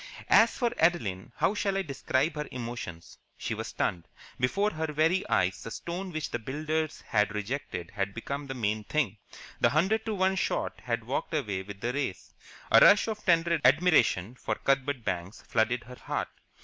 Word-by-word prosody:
As 230 - +6
for 240 -2 +1
Adeline, 115 - +1
how - - +2
shall 200 -2 0
I 195 - 0
describe 140 0 0
her 150 0 -4
emotions? 120 -9 -7 0.2
She - - -3
was - - -4
stunned. 85 -3 -2 0.3
Before 200 +12 +1
her 160 -2 -3
very 160 +5 +2
eyes 95 0 +1
the - - -6
stone 180 +9 -5
which 155 -2 -4
the 120 - -2
builders 155 +5 -2
had 105 0 +1
rejected 105 -5 -4
had 100 -1 -3
become 140 +4 -4
the 135 - -5
main 110 -2 -1
thing, 115 -5 -1 0.4
the 120 - +5
hundred 190 - +2
to 220 - -1
one 190 0 +2
shot - - -1
had - - -1
walked - - -2
away 100 -2 -1
with 100 +1 -10
the 120 +1 -1
race. 140 -9 -3 0.4
A - - +9
rush 205 +2 +7
of 215 -1 -4
tender 170 -2 +3
admiration 130 - +4
for 130 - -3
Cuthbert 135 -2 0
Banks 90 0 -4
flooded 120 +2 +1
her 125 - -11
heart. - - -3
135 Hz, 180 wpm, -29 LUFS, 105-170 Hz, 0.4 s, A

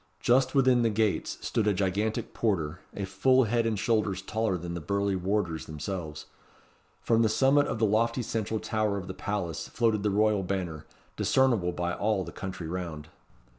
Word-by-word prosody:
Just 130 +2 +3
within 130 -2 +4
the 115 - +3
gates 110 -1 0
stood 110 -2 0
a 105 - +3
gigantic 105 +4 -1
porter, 90 -7 -1 0.2
a 100 - -3
full 130 +8 +3
head 115 +1 +1
and 110 -2 0
shoulders 105 -3 0
taller 110 -4 -1
than 85 0 -6
the 85 - -4
burly 100 +4 0
warders 90 -3 -1
themselves. 80 0 -5 0.8
From 115 -1 +3
the 110 - +3
summit 135 +6 +3
of - - -2
the 110 - +2
lofty 115 +4 +1
central 110 0 -2
tower 110 -2 -1
of 95 - -5
the - - -6
palace 90 -6 -3
floated 110 -3 +1
the 105 - +1
royal 105 0 +2
banner, 90 -5 -4 0.3
discernible 120 -10 +2
by 90 0 -2
all 105 -1 0
the 85 - -8
country 95 -3 -6
round. 80 -4 -5
100 Hz, 175 wpm, -28 LUFS, 90-115 Hz, 0.8 s, within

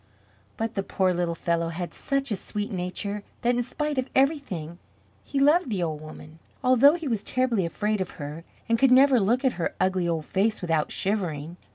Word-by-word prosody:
But 225 0 -2
the 195 - -1
poor 190 -1 +1
little 175 -1 -1
fellow 170 0 0
had 175 +1 -5
such 275 -2 -2
a - - +2
sweet 205 +2 -4
nature 190 +2 -3 0.2
that 240 +1 +3
in 245 - +1
spite 290 +3 -2
of 260 - -3
everything, 260 - 0 0.4
he 280 - -2
loved 295 +3 +4
the 195 -5 -1
old 155 -2 -3
woman, 155 +1 -11 0.2
although 255 +4 +6
he 330 -3 -5
was 225 -5 -1
terribly 245 -8 0
afraid 210 +3 -1
of 185 - -2
her 150 +1 -6 0.2
and 230 0 +2
could 270 - +5
never 260 0 +6
look 240 +7 +1
at 260 - +3
her - - -1
ugly 185 -2 +1
old 160 -2 -1
face 215 +3 0
without 165 -4 0
shivering. 175 -6 -2
205 Hz, 195 wpm, -26 LUFS, 170-255 Hz, 0.4 s, although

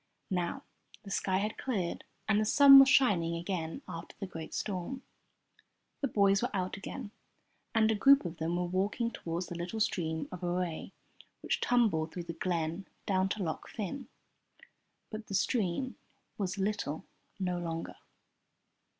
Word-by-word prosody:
Now 175 -2 -1 0.4
the 195 - -9
sky 190 -1 +1
had 210 +2 -2
cleared, 195 -10 -2 0.2
and 215 0 +3
the - - +3
sun 275 +4 +9
was 270 0 +8
shining 175 -12 +4
again 170 -2 -3
after 165 +1 -8
the 195 - -3
great 165 -4 -7
storm. 210 +7 -3 1.0
The 275 - 0
boys 200 -4 +3
were 245 - 0
out 185 -1 -1
again, 205 +3 -7 0.6
and 220 0 +5
a - - +3
group 275 +3 +6
of 170 -1 -5
them 165 +2 -1
were 180 0 0
walking 200 +6 0
toward 170 -2 -3
the 175 - -7
little 175 +6 -4
stream 160 -6 0
of 180 -1 -7
Aray 175 -2 -2 0.5
which - - -1
tumbled 200 -11 +2
through 175 - -5
the 170 - -6
glen 165 +1 -2 0.2
down 190 -1 +2
to 205 0 -2
Loch 160 -2 -4
Fyne. 225 +6 -5 1.0
But 215 -1 -6
the 195 - -3
stream 225 +5 0 0.4
was 195 0 -2
"little" 195 -5 -2 0.3
no 180 -2 -1
longer. 165 -1 -4
185 Hz, 155 wpm, -32 LUFS, 170-215 Hz, 1.0 s, sun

